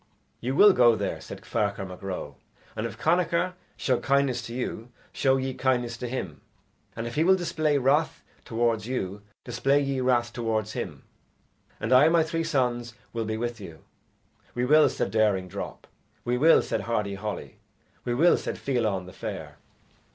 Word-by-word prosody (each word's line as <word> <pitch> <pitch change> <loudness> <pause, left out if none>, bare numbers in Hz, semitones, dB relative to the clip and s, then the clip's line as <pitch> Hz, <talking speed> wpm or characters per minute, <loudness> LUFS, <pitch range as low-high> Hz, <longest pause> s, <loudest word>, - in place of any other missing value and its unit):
"You 130 +3 -2
will 205 +4 +8
go 120 -5 +5
there," - - -3
said - - -9
Ferchar 100 -2 -1
Mac 90 -1 -10
Ro; 95 -2 -5 0.4
"and 110 - -2
if - - -10
Connachar 175 +2 +1 0.2
show 125 -3 +1
kindness 135 -3 +1
to 115 - -8
you, 125 -2 -4 0.2
show 135 -1 +2
ye 130 0 -2
kindness 125 -3 0
to 125 - -4
him; 95 -11 -5 0.5
and 115 - -4
if 120 - -5
he 155 - +2
will 190 +3 +5
display 155 -4 0
wrath 140 +4 +1 0.2
towards 115 -1 0
you 100 -6 -3 0.2
display 140 +1 +1
ye 135 -2 -1
wrath 120 -2 +1
towards 110 -3 -1
him, - - -5 0.8
and 110 +4 0
I 130 +3 +7
and 160 - +4
my 165 -1 +5
three 165 +1 -2
sons 125 -7 -1 0.2
will 115 -1 -2
be 110 0 -2
with 120 -1 -4
you." 80 -6 -10 0.7
"We 125 0 0
will," 150 +3 +6
said - - -2
Daring 105 -4 +2
Drop. - - -7 0.4
"We 120 - +1
will," 160 +6 +5
said - - -2
Hardy 105 -4 -1
Holly. 105 +2 -6 0.5
"We 120 - -1
will," 170 +7 +5
said - - -4
Fiallan 110 -8 -1
the 90 - -11
Fair. - - -7
120 Hz, 175 wpm, -26 LUFS, 110-140 Hz, 0.8 s, will